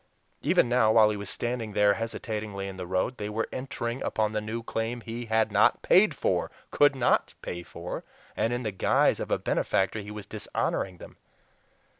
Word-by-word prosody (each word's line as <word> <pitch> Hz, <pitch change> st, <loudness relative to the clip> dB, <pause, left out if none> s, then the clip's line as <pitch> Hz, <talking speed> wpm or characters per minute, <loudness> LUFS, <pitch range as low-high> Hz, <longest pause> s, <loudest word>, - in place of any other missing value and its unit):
Even -, -, +3 dB
now, 120 Hz, -3 st, +4 dB
while 110 Hz, -1 st, +6 dB
he -, -, -2 dB
was 100 Hz, -2 st, -6 dB
standing 120 Hz, -3 st, -3 dB
there 105 Hz, 0 st, +4 dB
hesitatingly 110 Hz, -3 st, -4 dB
in 95 Hz, -, -6 dB
the 90 Hz, -1 st, -6 dB
road, 95 Hz, +8 st, -1 dB
they 105 Hz, 0 st, -4 dB
were 110 Hz, +2 st, -2 dB
entering 130 Hz, -2 st, -4 dB
upon 110 Hz, -1 st, 0 dB
the 105 Hz, 0 st, -1 dB
new 110 Hz, +2 st, -4 dB
claim 115 Hz, +1 st, -3 dB
he 120 Hz, +1 st, -6 dB
had 110 Hz, 0 st, +2 dB
NOT -, -, +3 dB
PAID -, -, +5 dB
FOR -, -, 0 dB, 0.2 s
COULD 145 Hz, -1 st, +4 dB
NOT 130 Hz, -, +2 dB
PAY 85 Hz, -, -4 dB
FOR 85 Hz, 0 st, -7 dB, 0.3 s
and 115 Hz, -, 0 dB
in 120 Hz, +1 st, -2 dB
the 110 Hz, -, -1 dB
guise 95 Hz, -, +2 dB
of -, -, -4 dB
a -, -, +2 dB
benefactor 95 Hz, +3 st, 0 dB
he 100 Hz, 0 st, -8 dB
was 105 Hz, -1 st, -7 dB
dishonoring 95 Hz, -3 st, -3 dB
them. -, -, -12 dB
110 Hz, 190 wpm, -28 LUFS, 100-115 Hz, 0.3 s, while